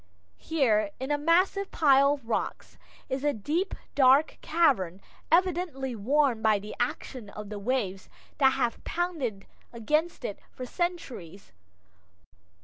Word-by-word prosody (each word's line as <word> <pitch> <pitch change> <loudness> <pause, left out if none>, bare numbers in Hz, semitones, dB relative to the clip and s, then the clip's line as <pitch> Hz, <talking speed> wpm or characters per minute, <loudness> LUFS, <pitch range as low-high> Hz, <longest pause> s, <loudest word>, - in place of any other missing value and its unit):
Here, 225 -10 +1
in 265 +3 -3
a 295 - +2
massive 370 +5 +2
pile 280 -2 +4
of 275 -6 -8
rocks, 230 - -3 0.3
is 265 +1 -3
a 295 -1 +2
deep, 310 - -2 0.2
dark 275 +2 +4
cavern, 235 - +2 0.3
evidently 335 -7 +1
worn 255 +2 +2
by 220 -1 +4
the 210 +1 -8
action 245 -2 -3
of 210 0 -8
the 210 -1 -5
waves 200 -4 -2 0.3
that 265 -2 +5
have 235 -3 -1
pounded 310 - -3 0.3
against 300 +9 -1
it 200 - -4
for 255 - -8
centuries. 245 - -4
265 Hz, 130 wpm, -28 LUFS, 215-315 Hz, 0.3 s, that